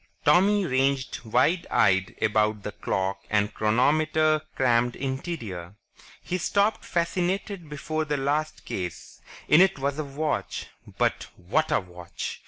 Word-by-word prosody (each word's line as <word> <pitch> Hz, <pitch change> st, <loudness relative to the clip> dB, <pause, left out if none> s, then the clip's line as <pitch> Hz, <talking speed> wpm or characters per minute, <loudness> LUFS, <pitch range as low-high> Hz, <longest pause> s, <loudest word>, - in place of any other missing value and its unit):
Tommy 200 Hz, +2 st, +4 dB
ranged 135 Hz, -2 st, 0 dB
wide 170 Hz, +10 st, +2 dB
eyed 95 Hz, 0 st, +2 dB
about 105 Hz, -1 st, +1 dB
the 105 Hz, -, -4 dB
clock 95 Hz, 0 st, -2 dB
and 105 Hz, -1 st, +1 dB
chronometer 155 Hz, +7 st, +2 dB
crammed 120 Hz, -1 st, +2 dB
interior. 125 Hz, -, -5 dB, 0.5 s
He 180 Hz, -, -2 dB
stopped 200 Hz, +5 st, +1 dB
fascinated 180 Hz, +1 st, -2 dB
before 155 Hz, +1 st, -3 dB
the 145 Hz, -1 st, -1 dB
last 145 Hz, +3 st, -1 dB
case. 90 Hz, -4 st, -6 dB, 0.3 s
In 150 Hz, +3 st, +7 dB
it 190 Hz, -2 st, +4 dB
was 140 Hz, +2 st, -2 dB
a -, -, 0 dB
watch... 145 Hz, +2 st, -3 dB, 0.3 s
but, -, -, +1 dB
what 115 Hz, -, 0 dB
a -, -, +4 dB
watch! 90 Hz, -2 st, -7 dB
140 Hz, 130 wpm, -26 LUFS, 105-155 Hz, 0.5 s, In